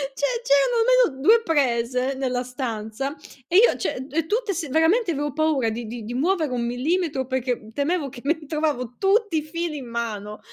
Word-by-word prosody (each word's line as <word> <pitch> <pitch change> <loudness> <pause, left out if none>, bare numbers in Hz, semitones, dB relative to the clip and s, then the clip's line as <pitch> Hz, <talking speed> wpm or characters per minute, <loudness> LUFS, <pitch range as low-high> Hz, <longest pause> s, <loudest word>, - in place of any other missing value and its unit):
Cioè 460 - -1
c'erano - - +3 0.3
almeno 265 -1 -11
2 450 +10 +6
prese 255 - +1
nella 255 -2 -2
stanza, 250 +1 -4 0.3
e 350 - +3
io 470 +4 +6
cioè 260 +1 -3
e 320 +2 0
tutte 435 +1 0
s 330 -4 -4
veramente 340 - +3
avevo 295 -2 -2
paura 300 -6 +1
di 225 +1 -5
di 230 +1 -6
di 225 +3 -6
muovere 315 +2 +1
1 240 -1 -1
millimetro 275 +3 -1
perché 250 -4 -3
temevo 290 +3 -1
che 245 -2 -11
mi 315 +2 -1
trovavo 290 -6 -2
tutti 405 -2 +2
i - - +1
fili 330 0 -4
in 260 -3 -8
mano. 215 -3 -4
280 Hz, 180 wpm, -23 LUFS, 245-335 Hz, 0.3 s, 2